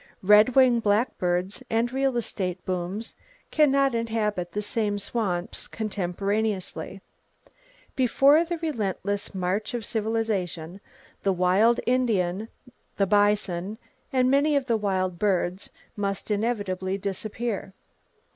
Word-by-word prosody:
Red 210 +5 +6
winged 250 -3 +5
blackbirds 200 -3 0
and 230 +2 0
real 270 -2 +1
estate 185 -6 -3
booms 185 +4 -3 0.4
can 300 -2 +4
not 275 -1 +3
inhabit 215 -6 -1
the 210 - -1
same 205 -1 -1
swamps 200 -4 -2
contemporaneously. 200 -1 -2 0.9
Before 275 +5 +5
the 340 0 -3
relentless 205 - -3
march 190 +5 -1
of 230 -3 -4
civilization, 205 -6 -2 0.4
the 195 - +2
wild 190 +6 +3
Indian, 220 -6 +1 0.5
the 195 - +3
bison 205 -1 +1 0.3
and 255 -1 +3
many 290 +2 +3
of 280 -2 +1
the 235 -3 +1
wild 185 -4 -1
birds 185 -2 0 0.3
must 200 0 -3
inevitably 200 -4 -1
disappear. 200 +1 -4
210 Hz, 110 wpm, -26 LUFS, 190-235 Hz, 0.9 s, Red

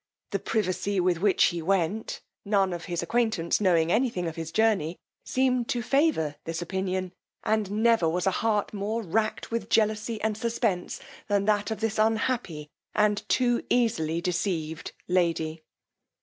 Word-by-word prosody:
The - - 0
privacy 200 -1 -1
with 180 -2 +2
which 200 -1 +4
he 175 -1 +2
went, 195 +4 -1 0.2
none 195 -3 +2
of 170 -1 -6
his 175 -2 -2
acquaintance 220 -3 +1
knowing 170 -4 +3
any 250 +5 +3
thing 180 -6 -3
of 160 - -5
his 165 -1 -5
journey, 205 -7 +1 0.3
seemed 255 -2 +1
to 240 -1 -1
favour 270 - +1
this 165 0 -4
opinion; 185 +1 -2 0.3
and 215 -2 +1
never 230 -8 +4
was 180 +2 -1
a 190 - +3
heart 210 +1 0
more 215 +3 -2
racked 215 +6 -1
with 230 0 -2
jealousy 215 +1 +1
and 220 0 0
suspence, 220 -5 -1 0.3
than 200 -1 +1
that 205 0 +1
of 220 -1 -4
this 225 -1 -1
unhappy, 220 -8 0 0.3
and 210 -1 +1
too 245 -2 +2
easily 170 -9 +1
deceived 170 -3 -2 0.2
lady. 165 -3 0
200 Hz, 155 wpm, -27 LUFS, 175-220 Hz, 0.3 s, which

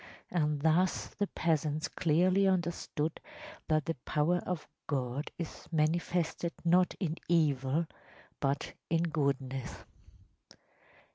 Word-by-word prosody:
And 150 -4 +1
thus 170 +4 +3
the 205 - -2
peasants 155 -3 0
clearly 185 +4 +3
understood 170 -4 -1 0.5
that 155 -2 +2
the 165 - 0
power 155 +4 +2
of 180 -4 -3 0.2
God 135 0 -1
is 170 -3 -6
manifested 170 +2 +1
not 180 +2 +4
in 170 -4 -1
evil, 150 -2 +2 0.5
but 140 0 -1 0.2
in 165 0 +2
goodness. 140 -5 -1
160 Hz, 100 wpm, -32 LUFS, 150-175 Hz, 0.5 s, not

